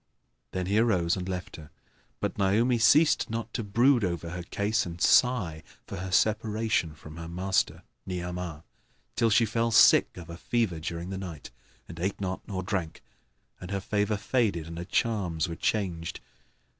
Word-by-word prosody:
Then 95 Hz, -1 st, -3 dB
he 100 Hz, +4 st, +2 dB
arose 90 Hz, -8 st, +2 dB
and 95 Hz, -1 st, -5 dB
left 90 Hz, -1 st, -5 dB
her, 80 Hz, -1 st, -12 dB, 0.5 s
but -, -, -2 dB
Naomi 110 Hz, +5 st, +2 dB
ceased 150 Hz, +9 st, +4 dB
not 115 Hz, 0 st, -4 dB
to 115 Hz, -, -2 dB
brood 120 Hz, +4 st, +3 dB
over 85 Hz, -2 st, -2 dB
her 90 Hz, 0 st, -5 dB
case 105 Hz, +4 st, 0 dB
and 85 Hz, -1 st, -7 dB
sigh 95 Hz, -10 st, +3 dB, 0.2 s
for -, -, -7 dB
her 95 Hz, +2 st, -5 dB
separation 110 Hz, -5 st, +1 dB
from 75 Hz, +2 st, -12 dB
her 85 Hz, 0 st, -7 dB
master, 95 Hz, +3 st, -1 dB, 0.2 s
Ni'amah, 90 Hz, -3 st, -5 dB, 0.5 s
till 115 Hz, -1 st, +3 dB
she 115 Hz, +2 st, +4 dB
fell 115 Hz, +2 st, 0 dB
sick 115 Hz, -, +5 dB
of 85 Hz, -2 st, -9 dB
a 85 Hz, -, -8 dB
fever 110 Hz, -6 st, -1 dB
during 85 Hz, +3 st, -5 dB
the 95 Hz, -, -4 dB
night 85 Hz, -7 st, -8 dB, 0.4 s
and 85 Hz, 0 st, -10 dB
ate 95 Hz, +3 st, -2 dB
not 95 Hz, -1 st, -3 dB
nor 95 Hz, -2 st, -3 dB
drank; 90 Hz, -4 st, -3 dB, 0.6 s
and 90 Hz, -, -8 dB
her 100 Hz, 0 st, -1 dB
favour 105 Hz, +2 st, 0 dB
faded 105 Hz, -8 st, 0 dB
and 85 Hz, +1 st, -7 dB
her 90 Hz, -, -5 dB
charms 90 Hz, -8 st, 0 dB
were 85 Hz, -, -5 dB
changed. 85 Hz, -4 st, -2 dB
95 Hz, 170 wpm, -28 LUFS, 85-110 Hz, 0.6 s, sick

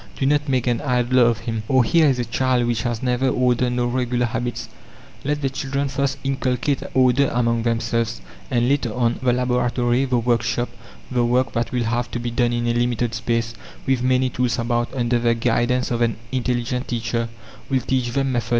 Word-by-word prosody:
Do 135 Hz, -, 0 dB
not 145 Hz, +1 st, +2 dB
make 130 Hz, -3 st, +1 dB
an 120 Hz, -2 st, 0 dB
idler 125 Hz, -2 st, +3 dB
of 115 Hz, -2 st, 0 dB
him!... 115 Hz, -1 st, -3 dB
Or, 130 Hz, 0 st, +4 dB
here 160 Hz, +6 st, +4 dB
is 130 Hz, -, +1 dB
a 120 Hz, -, -1 dB
child 125 Hz, +1 st, +1 dB
which 120 Hz, -2 st, 0 dB
has 120 Hz, 0 st, -3 dB
neither 125 Hz, +1 st, +1 dB
order 125 Hz, 0 st, +2 dB
nor 120 Hz, 0 st, 0 dB
regular 125 Hz, 0 st, 0 dB
habits. 120 Hz, 0 st, -3 dB, 0.6 s
Let 145 Hz, +1 st, -1 dB
the 135 Hz, -, +2 dB
children 140 Hz, 0 st, -2 dB
first 140 Hz, 0 st, -1 dB
inculcate 135 Hz, 0 st, 0 dB
order 130 Hz, +1 st, +4 dB
among 115 Hz, -1 st, +1 dB
themselves, 115 Hz, 0 st, -1 dB, 0.3 s
and 120 Hz, -3 st, +1 dB
later 135 Hz, -4 st, +1 dB
on, 120 Hz, -1 st, +1 dB
the 125 Hz, -1 st, +3 dB
laboratory, 125 Hz, 0 st, +1 dB
the 125 Hz, -2 st, +1 dB
workshop, 120 Hz, +1 st, 0 dB, 0.4 s
the 125 Hz, -1 st, +2 dB
work 125 Hz, +2 st, +1 dB
that 115 Hz, 0 st, -1 dB
will 125 Hz, -2 st, 0 dB
have 120 Hz, +2 st, -1 dB
to 120 Hz, -, -4 dB
be 120 Hz, 0 st, -3 dB
done 120 Hz, 0 st, +1 dB
in 120 Hz, 0 st, -1 dB
a 120 Hz, -, +1 dB
limited 120 Hz, -1 st, 0 dB
space, 115 Hz, 0 st, -1 dB, 0.3 s
with 130 Hz, -2 st, +1 dB
many 130 Hz, 0 st, +2 dB
tools 125 Hz, 0 st, 0 dB
about, 120 Hz, 0 st, -1 dB
under 120 Hz, -1 st, +1 dB
the 115 Hz, 0 st, +2 dB
guidance 120 Hz, +2 st, +1 dB
of 120 Hz, 0 st, -1 dB
an 115 Hz, -2 st, +2 dB, 0.2 s
intelligent 125 Hz, -1 st, -1 dB
teacher, 115 Hz, -1 st, -2 dB, 0.4 s
will 135 Hz, -2 st, +1 dB
teach 130 Hz, -2 st, 0 dB
them 135 Hz, +2 st, 0 dB
method. 120 Hz, -2 st, -2 dB
120 Hz, 195 wpm, -22 LUFS, 120-130 Hz, 0.6 s, Or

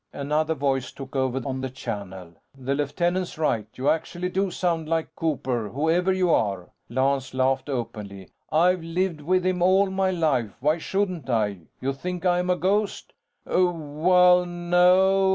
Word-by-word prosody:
Another 155 Hz, +3 st, -1 dB
voice 135 Hz, -3 st, -1 dB
took 135 Hz, 0 st, -10 dB
over 130 Hz, -1 st, 0 dB
on 130 Hz, -1 st, -3 dB
the 130 Hz, -, -3 dB
channel. 95 Hz, -8 st, -7 dB, 0.2 s
"The 135 Hz, +1 st, -2 dB
lieutenant's 175 Hz, +6 st, -1 dB
right. 115 Hz, -9 st, 0 dB
You 130 Hz, +2 st, -3 dB
actually 175 Hz, +3 st, 0 dB
do 190 Hz, +1 st, 0 dB
sound 165 Hz, -3 st, -1 dB
like 165 Hz, -1 st, -1 dB
Cooper, 130 Hz, -8 st, -2 dB
whoever 165 Hz, -, +1 dB
you 185 Hz, -2 st, +2 dB
are!" 100 Hz, -, 0 dB, 0.2 s
Lance 130 Hz, +1 st, 0 dB
laughed 130 Hz, +2 st, +1 dB
openly. 105 Hz, -7 st, -5 dB, 0.2 s
"I've 180 Hz, +3 st, +3 dB
lived 165 Hz, 0 st, -2 dB
with 185 Hz, +4 st, +1 dB
him 185 Hz, -1 st, 0 dB
all 190 Hz, +2 st, +4 dB
my 190 Hz, 0 st, +1 dB
life, 150 Hz, -, 0 dB
why 150 Hz, +5 st, +1 dB
shouldn't 185 Hz, -5 st, -2 dB
I? 105 Hz, -7 st, -1 dB
You 135 Hz, +1 st, -1 dB
think 180 Hz, +5 st, -5 dB
I'm 180 Hz, 0 st, +2 dB
a 180 Hz, -, +3 dB
ghost?" 200 Hz, +3 st, -1 dB, 0.3 s
"Well... 180 Hz, +1 st, +3 dB
no. 180 Hz, +2 st, +3 dB
160 Hz, 150 wpm, -25 LUFS, 130-180 Hz, 0.3 s, all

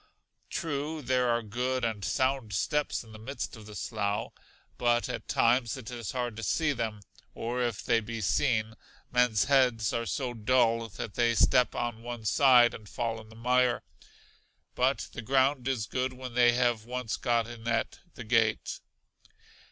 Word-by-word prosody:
True 155 Hz, -1 st, -3 dB
there 125 Hz, -1 st, +2 dB
are 120 Hz, 0 st, +1 dB
good 125 Hz, +4 st, -1 dB
and 110 Hz, -3 st, -3 dB
sound 130 Hz, -1 st, 0 dB
steps 150 Hz, +9 st, 0 dB
in 110 Hz, -, -15 dB
the 110 Hz, -, -11 dB
midst 135 Hz, +5 st, -5 dB
of 110 Hz, -2 st, -12 dB
the 105 Hz, -, -10 dB
slough, 100 Hz, -3 st, -2 dB, 0.5 s
but 120 Hz, -1 st, +2 dB
at -, -, -5 dB
times 120 Hz, 0 st, +2 dB
it 125 Hz, -3 st, -8 dB
is 120 Hz, -3 st, -5 dB
hard 120 Hz, -3 st, -2 dB
to -, -, -5 dB
see 155 Hz, +6 st, +1 dB
them; 110 Hz, -4 st, -3 dB, 0.3 s
or 120 Hz, +2 st, -2 dB
if 120 Hz, -4 st, -2 dB
they 115 Hz, -, +3 dB
be 115 Hz, +1 st, -6 dB
seen, 110 Hz, +3 st, +1 dB, 0.4 s
men's 125 Hz, -4 st, +3 dB
heads 125 Hz, -5 st, +3 dB
are 115 Hz, 0 st, -1 dB
so 120 Hz, +8 st, -2 dB
dull 115 Hz, 0 st, +2 dB
that 105 Hz, +1 st, -6 dB
they 120 Hz, -1 st, +2 dB
step 125 Hz, +2 st, +4 dB
on 120 Hz, -2 st, -3 dB
one 120 Hz, -1 st, -7 dB
side, 125 Hz, 0 st, +6 dB
and 105 Hz, -2 st, -10 dB
fall 115 Hz, 0 st, -3 dB
in 110 Hz, -, -16 dB
the 110 Hz, -, -14 dB
mire. 125 Hz, +1 st, +2 dB, 0.9 s
But -, -, 0 dB
the -, -, -5 dB
ground 130 Hz, +2 st, +2 dB
is 125 Hz, -6 st, 0 dB
good 130 Hz, +3 st, -2 dB
when 130 Hz, -1 st, -8 dB
they 120 Hz, 0 st, +5 dB
have 120 Hz, -3 st, +1 dB
once 125 Hz, -2 st, -3 dB
got 120 Hz, -1 st, +1 dB
in 115 Hz, -1 st, -9 dB
at 115 Hz, -1 st, -1 dB, 0.2 s
the 120 Hz, -, -7 dB
gate. 110 Hz, -1 st, +1 dB
120 Hz, 175 wpm, -29 LUFS, 110-125 Hz, 0.9 s, side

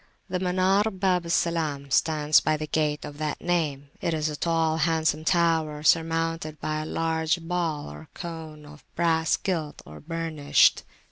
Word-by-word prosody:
The 180 Hz, 0 st, -1 dB
Munar 190 Hz, +3 st, +1 dB
Bab 180 Hz, -3 st, +1 dB
al -, -, -7 dB
Salam 155 Hz, -5 st, -1 dB
stands 150 Hz, +1 st, +4 dB
by 155 Hz, 0 st, 0 dB
the 155 Hz, -, -4 dB
gate 150 Hz, 0 st, -1 dB
of 145 Hz, 0 st, -9 dB
that 155 Hz, -1 st, -2 dB
name: 150 Hz, -5 st, -1 dB
it 165 Hz, -, 0 dB
is 155 Hz, 0 st, -1 dB
a 150 Hz, -, -4 dB
tall, 165 Hz, 0 st, +1 dB
handsome 160 Hz, 0 st, +1 dB
tower, 160 Hz, -3 st, +1 dB
surmounted 165 Hz, -1 st, +1 dB
by 155 Hz, 0 st, -2 dB
a 155 Hz, -, -6 dB
large 160 Hz, +1 st, 0 dB
ball 165 Hz, -3 st, -2 dB
or 75 Hz, +1 st, -11 dB
cone[FN#71] 155 Hz, -3 st, -8 dB
of 150 Hz, -, -20 dB
brass 165 Hz, -1 st, +2 dB
gilt 165 Hz, -6 st, -3 dB
or 75 Hz, -, -11 dB
burnished. 165 Hz, -2 st, +2 dB
160 Hz, 160 wpm, -26 LUFS, 150-170 Hz, -, stands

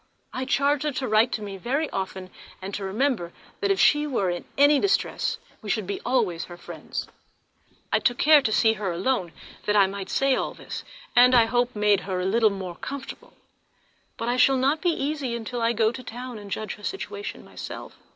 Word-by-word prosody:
I 255 Hz, -, -3 dB
charged 280 Hz, +2 st, +2 dB
her 300 Hz, -, +1 dB
to 260 Hz, 0 st, -2 dB
write 220 Hz, +3 st, +4 dB
to 215 Hz, -, -2 dB
me 200 Hz, -1 st, -6 dB
very 275 Hz, -, -1 dB
often, 190 Hz, -1 st, -4 dB, 0.3 s
and 190 Hz, +2 st, -7 dB
to 200 Hz, -, -4 dB
remember 205 Hz, -3 st, 0 dB, 0.3 s
that 400 Hz, -, 0 dB
if 390 Hz, -, +2 dB
she 295 Hz, 0 st, +4 dB
were 200 Hz, -10 st, 0 dB
in 175 Hz, -, -5 dB
any 285 Hz, +1 st, +6 dB
distress 390 Hz, +3 st, 0 dB, 0.2 s
we 210 Hz, -, -7 dB
should 200 Hz, +1 st, 0 dB
be 200 Hz, +1 st, -4 dB
always 210 Hz, -10 st, 0 dB
her 175 Hz, -, -11 dB
friends. -, -, -6 dB, 0.9 s
I -, -, +5 dB
took 245 Hz, -2 st, +1 dB
care 300 Hz, -1 st, +7 dB
to 225 Hz, -, 0 dB
see 220 Hz, +1 st, +4 dB
her 205 Hz, -4 st, -3 dB
alone, 185 Hz, 0 st, -1 dB, 0.4 s
that 210 Hz, -, +2 dB
I 200 Hz, -2 st, +7 dB
might 195 Hz, 0 st, -5 dB
say 275 Hz, 0 st, +2 dB
all -, -, -2 dB
this, -, -, -7 dB, 0.3 s
and 250 Hz, +1 st, +7 dB
I 235 Hz, -2 st, +7 dB
hope 245 Hz, +1 st, 0 dB
made 210 Hz, -1 st, +3 dB
her 190 Hz, -2 st, -3 dB
a 180 Hz, -, -1 dB
little 220 Hz, +3 st, +4 dB
more 190 Hz, -3 st, -6 dB
comfortable; 280 Hz, -1 st, -7 dB, 0.8 s
but 230 Hz, -, -3 dB
I 245 Hz, +1 st, +1 dB
shall 265 Hz, +1 st, +5 dB
not 275 Hz, +4 st, +1 dB
be 355 Hz, -, +2 dB
easy 280 Hz, -6 st, -2 dB
till 240 Hz, +2 st, -4 dB
I 230 Hz, -, +3 dB
can 235 Hz, -, 0 dB
go 220 Hz, 0 st, +3 dB
to 255 Hz, -, -8 dB
town 245 Hz, -1 st, -7 dB
and 205 Hz, -1 st, -10 dB
judge 215 Hz, +1 st, -3 dB
of -, -, -7 dB
her -, -, -16 dB
situation 410 Hz, -, -5 dB
myself. -, -, -8 dB
235 Hz, 215 wpm, -25 LUFS, 200-270 Hz, 0.9 s, care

